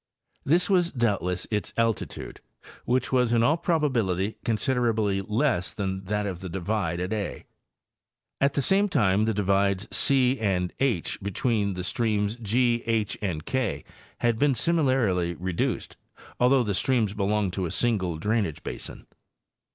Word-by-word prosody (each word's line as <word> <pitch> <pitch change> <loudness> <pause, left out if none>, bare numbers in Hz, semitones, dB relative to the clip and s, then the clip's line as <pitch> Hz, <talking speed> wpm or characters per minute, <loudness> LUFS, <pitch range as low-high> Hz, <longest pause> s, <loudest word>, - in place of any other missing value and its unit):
This 170 +6 +2
was 180 -3 +2
doubtless 100 -7 0
its 105 -1 -2
altitude, 115 -2 -2 0.4
which 130 +1 0
was 125 -2 +2
in 115 -1 +3
all 145 +6 +4
probability 125 - 0
considerably 110 -3 +1
less 105 -1 0
than 95 -1 -3
that 105 +1 -1
of 95 -4 -4
the 95 0 -6
divide 90 -1 -2
at 90 +4 -2
a. 105 -4 -4 0.9
At 140 0 +2
the 140 - +1
same 200 +7 +3
time 105 - +2
the 110 - +1
divides 100 0 +1 0.2
e 130 -1 +3
and 95 -4 0
h, 120 -11 0
between 100 +1 0
the 90 0 -5
streams 105 0 0
G, 120 +1 +1
H 110 -3 0
and 85 -7 -3
K, 130 -5 -1 0.4
had 120 -2 +1
been 145 -2 +3
similarly 120 - +1
reduced, 90 -1 -2 0.4
although 125 +1 +4
the 105 -3 -1
streams 110 -1 +1
belong 105 -1 0
to 90 0 -2
a - - -5
single 95 -6 0
drainage 105 -3 -1
basin. - - -7
110 Hz, 145 wpm, -26 LUFS, 95-125 Hz, 0.9 s, all